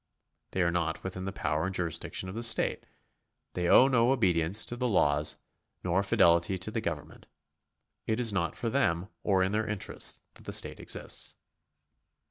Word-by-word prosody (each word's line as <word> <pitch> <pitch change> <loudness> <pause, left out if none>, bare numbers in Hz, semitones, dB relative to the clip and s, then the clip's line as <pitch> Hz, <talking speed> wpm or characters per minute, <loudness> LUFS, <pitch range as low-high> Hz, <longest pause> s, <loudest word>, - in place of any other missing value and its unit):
They 95 - +1
are 85 - +1
not 85 -1 -2
within 95 0 -5
the 95 - -3
power 75 -2 -1
and 95 - -4
jurisdiction 85 +1 -2
of 95 - -6
the 115 - -4
state; 115 -1 +2 0.7
they 90 -1 -1
owe 130 - +7
no 125 -2 +3
obedience 95 -5 +2
to 120 - -4
the 125 +1 -1
laws, 75 -8 +2 0.5
nor 90 +2 +1
fidelity 85 -1 +3
to 95 +4 -4
the 115 - -2
government; 80 -8 -6 0.8
it 110 +1 0
is 115 -4 0
not 85 -4 -1
for 115 - -2
them 95 -9 0
or 95 -2 +2
in 95 - 0
their 110 +1 -1
interests 100 -4 0
that - - -17
the - - -3
state - - 0
exists. - - -3
95 Hz, 175 wpm, -29 LUFS, 85-110 Hz, 0.8 s, owe